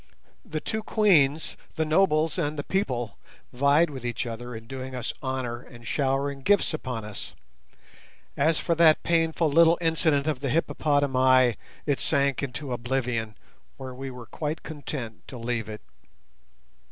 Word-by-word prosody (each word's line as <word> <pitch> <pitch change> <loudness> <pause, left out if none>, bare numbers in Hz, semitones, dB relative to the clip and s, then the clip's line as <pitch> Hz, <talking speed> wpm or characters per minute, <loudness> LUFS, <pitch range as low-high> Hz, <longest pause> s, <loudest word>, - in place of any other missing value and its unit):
The 155 - -4
two 220 +7 -3
Queens, 160 -10 +3 0.2
the 160 -1 0
nobles 160 0 +2
and 150 -2 -1
the 145 - -2
people 125 - -2 0.3
vied 140 +5 +4
with 130 -3 -7
each 120 0 -2
other 120 +1 -6
in 110 0 -8
doing 130 +1 -6
us 125 -3 -3
honour 130 -3 -3
and 120 -2 -14
showering 135 +1 0
gifts 200 +3 +3
upon 125 -8 -4
us. 105 -1 -8 1.0
As 155 +3 +2
for 170 - 0
that 165 -1 +5
painful 165 -1 +2
little 165 +2 +6
incident 160 -4 +2
of 155 -4 -1
the 135 0 -2
hippopotami 130 -4 +3 0.3
it 145 -3 +1
sank 140 -3 +2
into 135 0 -4
oblivion, 120 -3 -2 0.4
where 130 -1 -7
we 135 +1 -6
were 125 -2 -9
quite 150 +6 -4
content 140 -7 -6
to 130 - -8
leave 115 -2 -2
it. 105 0 -7
140 Hz, 150 wpm, -26 LUFS, 125-155 Hz, 1.0 s, little